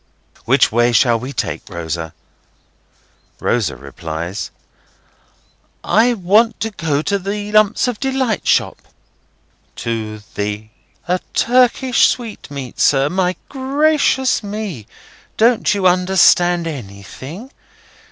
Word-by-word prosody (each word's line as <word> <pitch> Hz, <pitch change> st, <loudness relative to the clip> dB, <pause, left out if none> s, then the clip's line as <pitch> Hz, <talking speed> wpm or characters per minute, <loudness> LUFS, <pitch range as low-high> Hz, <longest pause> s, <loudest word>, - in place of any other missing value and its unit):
"Which -, -, +3 dB
way 120 Hz, +2 st, +3 dB
shall 115 Hz, 0 st, +3 dB
we 130 Hz, +4 st, -6 dB
take, -, -, -4 dB
Rosa?" 85 Hz, -2 st, -5 dB, 1.2 s
Rosa 115 Hz, -, 0 dB
replies: 80 Hz, -, -6 dB, 1.3 s
"I 235 Hz, +3 st, +3 dB
want 210 Hz, +4 st, +2 dB
to 225 Hz, -, -2 dB
go 155 Hz, -6 st, -1 dB
to 200 Hz, +3 st, 0 dB
the 205 Hz, +2 st, -4 dB
Lumps 215 Hz, +3 st, +3 dB
of 245 Hz, -4 st, -3 dB
Delight 265 Hz, -5 st, -1 dB
shop." -, -, +1 dB, 0.9 s
"To 110 Hz, -2 st, -4 dB
the—?" 105 Hz, +1 st, -4 dB, 0.4 s
"A 180 Hz, +1 st, +1 dB, 0.2 s
Turkish 250 Hz, +1 st, +3 dB
sweetmeat, 145 Hz, -, -5 dB
sir. 135 Hz, 0 st, +3 dB
My 185 Hz, 0 st, 0 dB
gracious 275 Hz, -1 st, +1 dB
me, 200 Hz, -, -6 dB, 0.5 s
don't 230 Hz, +1 st, +3 dB
you 195 Hz, -2 st, -1 dB
understand 180 Hz, -1 st, +4 dB
anything? 135 Hz, -, -8 dB
180 Hz, 105 wpm, -18 LUFS, -, 1.3 s, understand